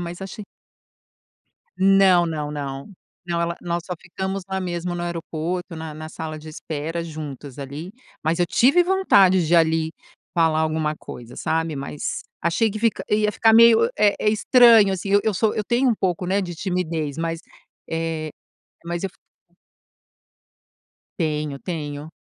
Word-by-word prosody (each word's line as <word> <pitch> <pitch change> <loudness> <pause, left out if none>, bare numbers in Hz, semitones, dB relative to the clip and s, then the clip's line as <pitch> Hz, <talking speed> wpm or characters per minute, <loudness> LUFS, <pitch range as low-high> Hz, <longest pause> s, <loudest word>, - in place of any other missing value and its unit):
mas 175 +1 -6
achei 205 +2 -7 1.3
Não, 190 -2 +5
não, 150 -3 -3
não. 140 +1 -6 0.4
Não, 170 -1 -1
ela 170 0 -1
nós 175 -1 -2
só 180 - -3
ficamos 190 +2 -4
lá 190 0 -2
mesmo 175 -1 -3
no 175 - -4
aeroporto, 170 +1 -4
na 160 -1 -7
na 155 +1 -7
sala 160 -1 -6
de 155 +1 -11
espera, 155 +1 -4
juntas 150 -4 -8
ali, 145 +6 -7 0.3
mas 160 +2 0
eu 175 - +3
tive 275 - +4
vontade 195 - +4
de 170 +2 +4
ali 160 -1 +2 0.4
falar 165 -2 +3
alguma 155 -1 0
coisa, 120 -4 -10
sabe? 160 +1 -1
Mas 140 +1 -4 0.2
achei 190 +7 +2
que 215 - -5
fica 230 0 0
ia 210 0 +2
ficar 225 0 +4
meio, 230 - +7
eh 205 -1 +4
eh, - - +2
estranho 225 -2 +6
assim. 190 +1 -4
Eu 200 +1 +5
eu 220 - +2
sou 210 +3 +1
eu 215 - -2
tenho 245 +4 +2
um 235 - +3
pouco, 180 -3 -1
né, 195 +2 +1
de 175 -2 -5
timidez, 165 -5 -2
mas, 165 0 -3 0.5
eh, 165 -1 -2 0.6
mas 170 0 -3
eu 195 - -2
f 195 - -28 2.0
Tenho, 150 -3 -1
tenho, 150 -4 -5
170 Hz, 160 wpm, -22 LUFS, 155-195 Hz, 2.0 s, meio